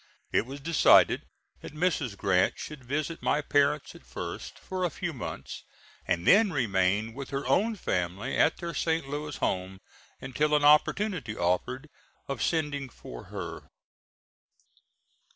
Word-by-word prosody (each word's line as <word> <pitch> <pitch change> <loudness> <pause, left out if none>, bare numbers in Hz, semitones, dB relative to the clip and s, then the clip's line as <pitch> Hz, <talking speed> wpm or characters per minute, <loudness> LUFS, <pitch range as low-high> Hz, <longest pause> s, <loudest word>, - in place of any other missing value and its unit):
It 115 - +1
was 140 +2 -7
decided 160 +2 +5 0.4
that - - -10
Mrs. 150 - 0
Grant 95 -2 +2
should 150 -3 -8
visit 150 +5 -3
my - - +2
parents 145 0 +1
at - - -15
first - - -7
for 185 -1 -4
a 180 - +2
few 175 +2 -4
months, 125 - -7 0.4
and 85 0 0
then 205 0 +6
remain 105 - +1
with 135 +1 -7
her 140 0 -3
own 205 - +2
family 95 - -2
at 160 - +3
their 170 -1 -5
St. 160 -3 0
Louis 145 +1 -4
home 95 +1 -2 0.4
until 150 +4 0
an 150 - +2
opportunity 150 - +3
offered 90 - -1 0.4
of 140 -3 -4
sending 145 -4 -1
for - - -10
her. - - -7
140 Hz, 140 wpm, -28 LUFS, 110-160 Hz, 0.4 s, then